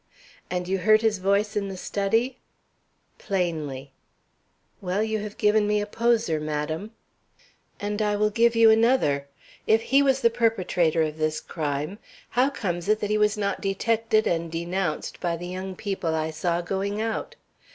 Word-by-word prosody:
"And 180 -1 -2
you 190 +1 0
heard 215 +3 +4
his 215 -3 +2
voice 200 +3 +1
in 200 -1 -1
the 190 -1 -6
study?" 225 +7 -1 0.8
"Plainly." 155 -8 -3 0.9
"Well, 190 +2 0
you 220 0 -1
have 210 0 -7
given 210 0 +3
me 210 0 +2
a 205 - -1
poser, 230 -6 +1
madam." 155 +7 -3 0.9
"And 205 0 -2
I 210 -1 +1
will 210 +1 +1
give 235 +2 +3
you 225 -1 +7
another. 220 - +3 0.4
If 220 - +5
he 275 +4 +4
was 270 -1 +2
the 235 - +4
perpetrator 185 -8 +1
of 155 0 -4
this 155 0 0
crime, 150 +4 -4 0.3
how 255 +3 +2
comes 175 -8 -3
it 215 0 +3
that 205 -1 -2
he 215 - +2
was 210 0 +2
not 200 -1 -1
detected 220 +2 +1
and 165 -1 -1
denounced 170 0 -3
by 170 -2 -1
the 175 - -7
young 185 +1 -5
people 185 -5 -2
I 160 0 -1
saw 170 +2 -1
going 195 +3 -2
out? 225 0 -3
200 Hz, 165 wpm, -25 LUFS, 170-220 Hz, 0.9 s, you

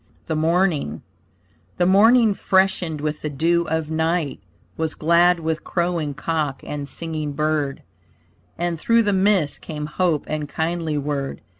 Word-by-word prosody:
THE 160 - -2
MORNING 160 - 0 0.7
The 175 - +2
morning 220 +4 +5
freshened 190 -6 +1
with 150 0 -3
the 150 - -3
dew 170 +4 +1
of 160 -1 -2
night, 160 -1 0 0.4
Was 160 -1 -2
glad 170 +2 +4
with 160 -1 -2
crowing 170 -5 -1
cock 150 -2 -2
and 145 -1 -5
singing 155 -3 -3
bird; 150 -1 -1 0.7
And 170 -1 -2
through 230 +6 +3
the 205 -1 +1
mists 190 -6 +2
came 150 -2 -6
hope 155 0 0
and 150 -1 -4
kindly 160 -1 -2
word. 140 -1 -3
160 Hz, 140 wpm, -22 LUFS, 150-175 Hz, 0.7 s, morning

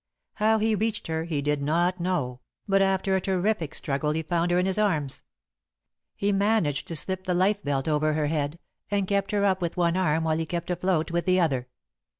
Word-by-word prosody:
How 220 +1 +3
he 220 +1 +1
reached 220 +1 -1
her 160 0 -2
he 150 -4 -2
did 145 0 0
not 175 +5 +1
know; 150 -9 -1 0.3
but 195 -1 +3
after 195 0 +2
a 190 - +1
terrific 190 -3 -1
struggle 150 +2 -1
he 160 +1 -2
found 170 +1 0
her 175 - +2
in 180 - +2
his 190 +2 0
arms. 155 -10 0 0.9
He 200 +1 0
managed 200 -8 +1
to 165 - -4
slip 185 +3 -3
the 180 - 0
lifebelt 180 -8 +1
over 155 0 +2
her 150 0 0
head, 150 0 -1 0.3
and 200 -1 0
kept 200 0 0
her 205 -1 +1
up 190 -1 +2
with 170 0 -2
one 170 -1 +2
arm 165 -4 +1
while 160 0 +1
he 165 - -2
kept 170 +1 -3
afloat 175 -2 0
with 170 +1 -1
the 185 0 +4
other. 135 -8 +1
175 Hz, 205 wpm, -26 LUFS, 155-195 Hz, 0.9 s, the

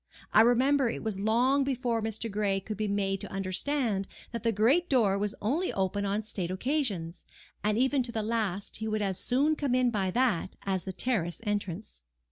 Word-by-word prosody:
I - - +8
remember 255 +3 +4
it - - -5
was 215 -3 -2
long 245 +7 +3
before 250 -4 -1
Mr. 220 +1 -3
Gray 200 -2 0
could 215 +3 -6
be 215 +1 -2
made 195 -1 -1
to - - -7
understand 195 +2 -1 0.2
that 235 -1 -4
the 230 - +2
great 255 - +3
door 225 -8 +3
was 205 +1 -1
only 305 - 0
open 195 +1 -1
on 205 +2 -1
state 195 -5 -4
occasions, 190 - -2 0.4
and 210 +1 +1
even 265 +2 +3
to 240 -1 -3
the 220 -2 -2
last 210 -3 -2
he 220 - -4
would 215 -1 0
as 190 -2 -1
soon 285 +5 +2
come 280 -4 0
in 250 -1 +3
by 195 -4 0
that 210 -4 +1
as 190 -2 -1
the 190 - -3
terrace 180 -7 0
entrance. 205 - -3
215 Hz, 195 wpm, -29 LUFS, 195-250 Hz, 0.4 s, I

